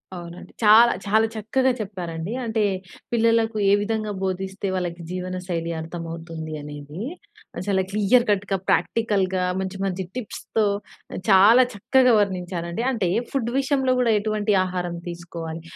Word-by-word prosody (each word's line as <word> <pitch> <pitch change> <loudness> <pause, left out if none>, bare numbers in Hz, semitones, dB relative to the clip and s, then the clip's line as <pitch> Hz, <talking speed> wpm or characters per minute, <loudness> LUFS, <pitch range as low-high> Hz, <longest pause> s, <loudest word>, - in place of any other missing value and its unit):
అవునండి. 175 0 -9
చాలా 220 +3 +8
చాలా 220 +2 +3
చక్కగా 255 +5 +1
చెప్పారండి. 185 -2 -5
అంటే, 220 -1 0 0.5
పిల్లలకు 230 -1 +2
ఏ - - +6
విధంగా 215 0 -2
బోధిస్తే, 190 +1 -3
వాళ్ళకి 175 -2 -3
జీవనశైలి 180 -2 -3
అర్థమవుతుంది 165 -1 -6
అనేది, 145 +2 -8 0.7
చాలా 190 -2 +2
క్లియర్‌కట్‌గా, 205 -2 +2
ప్రాక్టికల్‌గా, 190 0 +1 0.2
మంచి, 190 0 -4
మంచి 190 -1 -2
టిప్స్‌తో, 220 -2 -2 0.5
ఆహ్, - - -4
చాలా 210 +6 +7
చక్కగా 250 +5 +3
వర్ణించారండి. 180 0 -2
అంటే, 210 -8 0 0.2
ఫుడ్ 240 -4 -1
విషయంలో 265 -2 +1
కూడా 235 -2 +3
ఎటువంటి 210 -1 0
ఆహారం 180 -1 -3
తీసుకోవాలి? 170 -1 -7
195 Hz, 120 wpm, -23 LUFS, 175-220 Hz, 0.7 s, చాలా